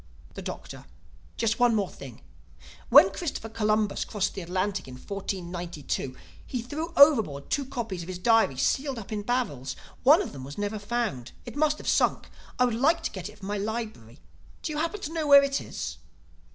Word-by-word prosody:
The -, -, -7 dB
Doctor: -, -, -7 dB, 0.5 s
"Just 225 Hz, 0 st, 0 dB
one 240 Hz, -2 st, +4 dB
more 200 Hz, -3 st, +1 dB
thing: -, -, -11 dB, 0.7 s
when -, -, +8 dB
Christopher 285 Hz, -, -4 dB
Columbus 215 Hz, -2 st, +1 dB
crossed 205 Hz, -3 st, -2 dB
the 195 Hz, -, -5 dB
Atlantic 185 Hz, +1 st, -2 dB
in 130 Hz, -, -9 dB
1492, 175 Hz, -5 st, -4 dB, 0.3 s
he 245 Hz, -3 st, -4 dB
threw 310 Hz, +7 st, -4 dB
overboard 220 Hz, -, +5 dB
two 285 Hz, -, +1 dB
copies 235 Hz, -9 st, -4 dB
of 170 Hz, -, -8 dB
his 185 Hz, -1 st, -5 dB
diary 220 Hz, -, +3 dB
sealed 270 Hz, -, 0 dB
up 225 Hz, 0 st, -8 dB
in 210 Hz, -1 st, -2 dB
barrels. 205 Hz, -, -2 dB, 0.3 s
One 305 Hz, +9 st, +6 dB
of -, -, -7 dB
them 135 Hz, -, -8 dB
was 140 Hz, +2 st, -9 dB
never 205 Hz, +1 st, -2 dB
found. 205 Hz, -, -3 dB
It -, -, -8 dB
must 300 Hz, 0 st, +2 dB
have -, -, -9 dB
sunk. -, -, +2 dB, 0.3 s
I 250 Hz, -, +4 dB
would 245 Hz, -, 0 dB
like 320 Hz, +8 st, +2 dB
to -, -, -2 dB
get 185 Hz, 0 st, -6 dB
it 210 Hz, -, -15 dB
for 200 Hz, -, -10 dB
my 205 Hz, +1 st, -2 dB
library. 215 Hz, -, -5 dB, 0.5 s
Do 315 Hz, -, -2 dB
you 300 Hz, -, -2 dB
happen 335 Hz, +6 st, -2 dB
to 310 Hz, -, -5 dB
know 320 Hz, -3 st, -1 dB
where 280 Hz, -1 st, +9 dB
it 275 Hz, 0 st, 0 dB
is?" -, -, -6 dB
220 Hz, 190 wpm, -27 LUFS, 185-270 Hz, 0.7 s, where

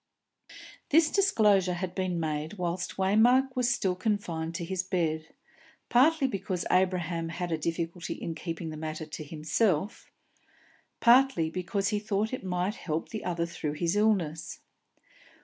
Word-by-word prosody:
This 310 Hz, +1 st, +4 dB
disclosure 210 Hz, -, +3 dB
had 180 Hz, 0 st, -4 dB
been 185 Hz, -2 st, -1 dB
made 155 Hz, 0 st, -2 dB
whilst 175 Hz, -2 st, -3 dB
Waymark 240 Hz, +7 st, +4 dB
was 245 Hz, -1 st, +2 dB
still 190 Hz, -6 st, +1 dB
confined 175 Hz, -5 st, -2 dB
to 170 Hz, -1 st, -3 dB
his 185 Hz, +1 st, -1 dB
bed; 165 Hz, -4 st, -1 dB, 0.6 s
partly 285 Hz, +4 st, +4 dB
because 190 Hz, -6 st, -3 dB
Abraham 180 Hz, -3 st, +1 dB
had 170 Hz, +1 st, -4 dB
a 160 Hz, -, +1 dB
difficulty 170 Hz, +2 st, -3 dB
in 165 Hz, -, -5 dB
keeping 165 Hz, 0 st, -5 dB
the 155 Hz, -, -7 dB
matter 155 Hz, 0 st, -5 dB
to 155 Hz, 0 st, -7 dB
himself; 155 Hz, +5 st, -1 dB, 0.9 s
partly 235 Hz, -9 st, +5 dB
because 190 Hz, +3 st, -1 dB
he 210 Hz, -2 st, 0 dB
thought 210 Hz, +2 st, -1 dB
it 255 Hz, -, -4 dB
might 180 Hz, +2 st, -1 dB
help 160 Hz, -7 st, -4 dB
the 220 Hz, -, -5 dB
other 170 Hz, -2 st, -1 dB
through 155 Hz, -3 st, -4 dB
his 170 Hz, +4 st, -1 dB
illness. 170 Hz, -7 st, 0 dB
180 Hz, 145 wpm, -29 LUFS, 165-210 Hz, 0.9 s, partly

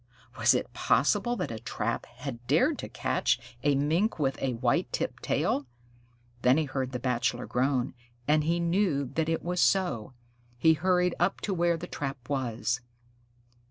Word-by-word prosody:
Was -, -, +5 dB
it -, -, -2 dB
possible 240 Hz, 0 st, +2 dB
that 180 Hz, -, -3 dB
a 110 Hz, -, -5 dB
trap 115 Hz, 0 st, -3 dB
had 120 Hz, -1 st, -8 dB
dared -, -, +3 dB
to -, -, -5 dB
catch -, -, 0 dB, 0.2 s
a 145 Hz, +1 st, +3 dB
Mink 160 Hz, +11 st, +1 dB
with 135 Hz, -4 st, 0 dB
a 130 Hz, -2 st, 0 dB
white 120 Hz, 0 st, 0 dB
tipped -, -, -3 dB
tail? 140 Hz, -1 st, 0 dB, 0.7 s
Then 125 Hz, +3 st, +5 dB
he 160 Hz, -, +1 dB
heard 135 Hz, -2 st, -3 dB
the 125 Hz, -, -2 dB
Bachelor 125 Hz, -1 st, -1 dB
groan, 130 Hz, 0 st, 0 dB, 0.3 s
and 150 Hz, +1 st, +4 dB
he 170 Hz, +3 st, +1 dB
knew 170 Hz, -4 st, +1 dB
that 160 Hz, -1 st, 0 dB
it 165 Hz, -, -1 dB
was 180 Hz, +1 st, 0 dB
so. 175 Hz, -, +1 dB, 0.4 s
He 160 Hz, +6 st, +5 dB
hurried 180 Hz, +1 st, +2 dB
up 180 Hz, +3 st, +1 dB
to 200 Hz, -, -1 dB
where 170 Hz, -1 st, +2 dB
the -, -, -6 dB
trap 135 Hz, -3 st, -5 dB
was. 120 Hz, -3 st, -1 dB
140 Hz, 165 wpm, -29 LUFS, 125-170 Hz, 0.7 s, Was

